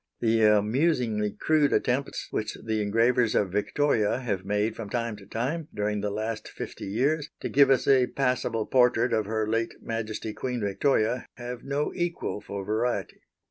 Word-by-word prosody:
The 115 Hz, -1 st, +2 dB
amusingly 110 Hz, +1 st, +2 dB
crude 145 Hz, +8 st, +2 dB
attempts 135 Hz, +3 st, 0 dB
which 110 Hz, -, -3 dB
the 110 Hz, -1 st, 0 dB
engravers 115 Hz, +3 st, +2 dB
of 100 Hz, -3 st, +2 dB
Victoria 110 Hz, +2 st, +1 dB
have 100 Hz, -7 st, -2 dB
made 105 Hz, +3 st, 0 dB
from 110 Hz, -3 st, -6 dB
time 115 Hz, -1 st, -2 dB
to 100 Hz, -2 st, -14 dB
time, 140 Hz, +9 st, -2 dB
during 105 Hz, 0 st, -1 dB
the 105 Hz, -, -1 dB
last 110 Hz, +2 st, -3 dB
fifty -, -, -7 dB
years, 140 Hz, +9 st, 0 dB
to -, -, -3 dB
give 140 Hz, 0 st, +5 dB
us 135 Hz, -2 st, +3 dB
a 130 Hz, -2 st, +5 dB
passable 125 Hz, -4 st, 0 dB
portrait 125 Hz, -1 st, +3 dB
of 110 Hz, -2 st, +1 dB
Her 110 Hz, 0 st, -1 dB
late 115 Hz, +1 st, -1 dB
Majesty 110 Hz, -1 st, -4 dB
Queen 125 Hz, +2 st, -3 dB
Victoria, 115 Hz, +3 st, +1 dB
have 120 Hz, -1 st, -7 dB
no 140 Hz, +2 st, -1 dB
equal 175 Hz, -, -2 dB
for 100 Hz, -2 st, -6 dB
variety. 115 Hz, +4 st, -1 dB
115 Hz, 165 wpm, -27 LUFS, 105-125 Hz, -, give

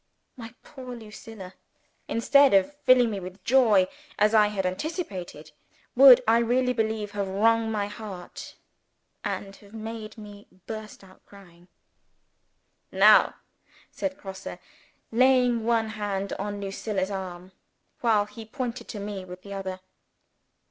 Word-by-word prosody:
My 230 Hz, -1 st, -10 dB
poor 255 Hz, -4 st, -9 dB
Lucilla 215 Hz, -3 st, -11 dB, 0.5 s
instead 275 Hz, +2 st, +4 dB
of 195 Hz, +10 st, +2 dB
filling 250 Hz, -3 st, +5 dB
me 200 Hz, -, -3 dB
with 185 Hz, +1 st, -10 dB
joy, 225 Hz, -7 st, +4 dB, 0.3 s
as 210 Hz, +1 st, +3 dB
I 210 Hz, -1 st, +6 dB
had 200 Hz, -2 st, -3 dB
anticipated 185 Hz, -, -5 dB, 0.4 s
would 255 Hz, -1 st, +9 dB
I 230 Hz, +1 st, +5 dB
really 250 Hz, +2 st, +1 dB
believe 220 Hz, -2 st, -2 dB
have 200 Hz, -1 st, -3 dB
wrung 225 Hz, +3 st, +2 dB
my 210 Hz, -2 st, -1 dB
heart, 205 Hz, -3 st, -9 dB, 0.7 s
and 195 Hz, -1 st, -4 dB
have 205 Hz, +1 st, -16 dB
made 220 Hz, 0 st, -7 dB
me 205 Hz, -1 st, -12 dB, 0.2 s
burst 215 Hz, -2 st, -8 dB
out 190 Hz, -1 st, -19 dB
crying. 180 Hz, -3 st, -17 dB, 1.2 s
"Now!" -, -, +6 dB, 0.6 s
said 285 Hz, -1 st, -4 dB
Grosse, 190 Hz, -1 st, -8 dB, 0.5 s
laying 250 Hz, -1 st, +3 dB
one 225 Hz, -1 st, +1 dB
hand 205 Hz, -2 st, -3 dB
on 205 Hz, +1 st, -4 dB
Lucilla's 195 Hz, 0 st, -3 dB
arm, 185 Hz, -1 st, -6 dB, 0.5 s
while 220 Hz, -4 st, +2 dB
he 225 Hz, +2 st, -11 dB
pointed 235 Hz, +1 st, -5 dB
to 210 Hz, -, -7 dB
me 200 Hz, -1 st, -5 dB
with 180 Hz, 0 st, -11 dB
the 200 Hz, -, -8 dB
other. 190 Hz, -1 st, -5 dB
210 Hz, 130 wpm, -26 LUFS, 195-230 Hz, 1.2 s, would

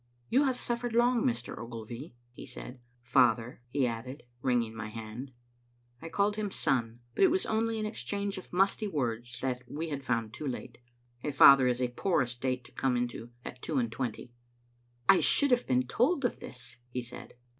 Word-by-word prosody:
"You 270 Hz, +5 st, +4 dB
have 260 Hz, -2 st, +2 dB
suffered 240 Hz, 0 st, -2 dB
long, 240 Hz, 0 st, +4 dB
Mr. 120 Hz, 0 st, -1 dB
Ogilvy," 115 Hz, +4 st, -8 dB, 0.2 s
he 120 Hz, -, -10 dB
said. 125 Hz, +1 st, -8 dB, 0.2 s
"Father," 120 Hz, -1 st, +3 dB
he 135 Hz, +1 st, +1 dB
added, 125 Hz, +4 st, -4 dB, 0.2 s
wringing 120 Hz, -3 st, +1 dB
my 115 Hz, -1 st, -5 dB
hand. 115 Hz, +4 st, -7 dB, 0.7 s
I 165 Hz, -, -6 dB
called 205 Hz, +4 st, +1 dB
him 210 Hz, -1 st, -1 dB
son; 120 Hz, -8 st, 0 dB
but -, -, +2 dB
it 380 Hz, -, +7 dB
was 370 Hz, +4 st, +1 dB
only 225 Hz, 0 st, 0 dB
an 215 Hz, -, -1 dB
exchange 200 Hz, -2 st, -3 dB
of -, -, -14 dB
musty 195 Hz, +3 st, +2 dB
words 120 Hz, -, -2 dB
that 125 Hz, -1 st, -1 dB
we 160 Hz, +2 st, -3 dB
had 140 Hz, -2 st, -4 dB
found 115 Hz, -4 st, -1 dB
too 145 Hz, +5 st, -5 dB
late. 125 Hz, -1 st, -5 dB, 0.4 s
A -, -, -1 dB
father 135 Hz, -2 st, +8 dB
is 125 Hz, 0 st, +1 dB
a 125 Hz, -1 st, +1 dB
poor 155 Hz, +4 st, +1 dB
estate 125 Hz, +1 st, -2 dB
to -, -, -16 dB
come 130 Hz, -2 st, 0 dB
into 120 Hz, -1 st, -3 dB, 0.2 s
at 125 Hz, -, -8 dB
two 155 Hz, -, -2 dB
and 120 Hz, -3 st, +1 dB
twenty. 120 Hz, 0 st, -4 dB, 0.4 s
" -, -, -38 dB, 0.3 s
I 195 Hz, -, +7 dB
should 285 Hz, -2 st, +4 dB
have 245 Hz, 0 st, +3 dB
been 125 Hz, 0 st, +2 dB
told 265 Hz, -, +2 dB
of 245 Hz, -, -1 dB
this," 125 Hz, -1 st, -9 dB
he 125 Hz, 0 st, -3 dB
said. 120 Hz, +1 st, -8 dB
130 Hz, 190 wpm, -31 LUFS, 120-200 Hz, 0.7 s, father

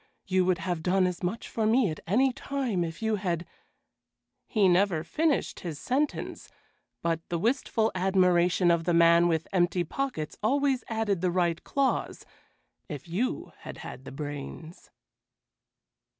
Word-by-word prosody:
You 185 Hz, -1 st, +2 dB
would 185 Hz, -1 st, +2 dB
have 175 Hz, -3 st, -3 dB
done 185 Hz, +3 st, +2 dB
as 180 Hz, -1 st, -2 dB
much 185 Hz, +6 st, -3 dB
for 220 Hz, -2 st, -1 dB
me 225 Hz, -4 st, +3 dB
at 155 Hz, -, -6 dB
any 255 Hz, +8 st, +3 dB
time 260 Hz, -9 st, -2 dB
if 165 Hz, +5 st, -6 dB
you 220 Hz, -1 st, +1 dB
had" 175 Hz, -3 st, -2 dB, 1.0 s
he 205 Hz, -3 st, +3 dB
never 180 Hz, -3 st, +3 dB
finished 305 Hz, -, 0 dB
his 165 Hz, -5 st, -5 dB
sentence, 275 Hz, -, -2 dB, 0.5 s
but 165 Hz, -1 st, +1 dB
the 170 Hz, -, -1 dB
wistful 225 Hz, +2 st, +1 dB
admiration 180 Hz, -1 st, +3 dB
of 170 Hz, -1 st, +1 dB
the 175 Hz, -1 st, +2 dB
man 170 Hz, +1 st, +6 dB
with 165 Hz, -1 st, 0 dB
empty 175 Hz, -1 st, +2 dB
pockets 210 Hz, -, -4 dB
always 270 Hz, +3 st, +1 dB
added 220 Hz, -5 st, -1 dB
the 185 Hz, -, +2 dB
right 175 Hz, -2 st, 0 dB
clause 275 Hz, -1 st, -1 dB, 0.6 s
"if 150 Hz, 0 st, -7 dB
you 195 Hz, +10 st, -2 dB
had -, -, -9 dB
had 130 Hz, -, -9 dB
the -, -, -8 dB
brains." 145 Hz, +3 st, -7 dB
180 Hz, 150 wpm, -28 LUFS, 170-225 Hz, 1.0 s, man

